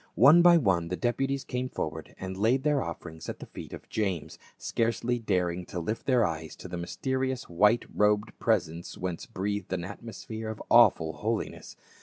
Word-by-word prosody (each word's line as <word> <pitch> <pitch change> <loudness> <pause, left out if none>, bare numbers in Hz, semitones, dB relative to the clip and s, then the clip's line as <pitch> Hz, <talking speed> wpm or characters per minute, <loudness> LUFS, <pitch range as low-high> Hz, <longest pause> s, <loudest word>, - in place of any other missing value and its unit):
One 145 - +8
by 175 0 +8
one 95 - +2
the 90 - -2
deputies 135 +5 -1
came 125 +1 -3
forward 80 -6 -5
and 95 0 -5
laid 115 +7 +2
their 150 -2 +2
offerings 85 -1 -7
at - - -5
the - - -9
feet - - -10
of - - -9
James, 95 -7 -2 0.2
scarcely 115 +1 0
daring 90 -5 0
to 90 - -4
lift 105 +7 -4
their 125 -4 +4
eyes 80 -2 -4
to - - -9
the 90 - -6
mysterious 130 +8 -2
white 105 +7 +3
robed 105 +1 +2
presence" 85 -7 0
whence 90 -2 -4
breathed 100 0 -3
an 90 -2 -2
atmosphere 110 +2 -7
of 110 - -6
awful 85 -9 +6
holiness. 110 +7 -3
105 Hz, 175 wpm, -28 LUFS, 90-120 Hz, 0.2 s, One